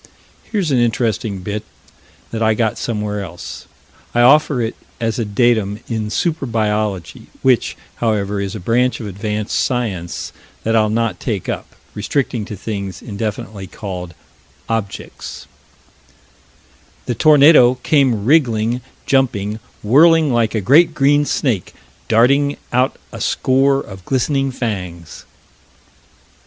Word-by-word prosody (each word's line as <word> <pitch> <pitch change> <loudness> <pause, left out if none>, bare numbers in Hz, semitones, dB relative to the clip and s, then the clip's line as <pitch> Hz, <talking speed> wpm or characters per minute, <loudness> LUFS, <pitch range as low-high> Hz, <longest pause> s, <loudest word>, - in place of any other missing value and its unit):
Here's 195 -8 -1
an 130 - +3
interesting 115 -4 0
bit 105 +3 -4 0.7
that 115 - -4
I 110 -1 +3
got 110 -2 0
somewhere 105 -3 -2
else. 85 -2 -9 0.5
I 120 - +4
offer 140 +1 +5
it 115 0 -2 0.2
as 115 -1 -1
a 115 - 0
datum 105 -1 +1
in 110 -2 -2
super 155 +3 -1
biology, 105 -5 -2 0.2
which, 130 -3 +2 0.2
however, 105 -3 0
is 100 0 -4
a - - -5
branch 120 +6 +1
of 115 - -6
advanced 105 +1 -3
science 100 -9 -2 0.3
that 115 +1 +1
I'll 110 -1 +3
not 115 -3 -1
take 105 -7 -3
up, - - -5 0.2
restricting 115 0 -1
to 110 -1 -7
things 100 -3 -5
indefinitely 105 -2 -5
called 90 -4 -7 0.5
"objects" 110 -3 -5 1.6
"The 120 - -1
tornado 145 -2 +6
came 130 -9 +2
wriggling, 120 -5 +2 0.2
jumping, 110 -6 +1 0.2
whirling 155 +5 +5
like 115 -2 +1
a 110 - 0
great 155 - +5
green 145 +1 +3
snake, 120 -10 -1 0.3
darting 140 +6 +3 0.2
out 125 +2 +2 0.2
a - - -8
score 135 +1 +2
of 95 -3 -10
glistening 135 +1 0
fangs." 90 -10 -5
115 Hz, 125 wpm, -18 LUFS, 105-130 Hz, 1.6 s, tornado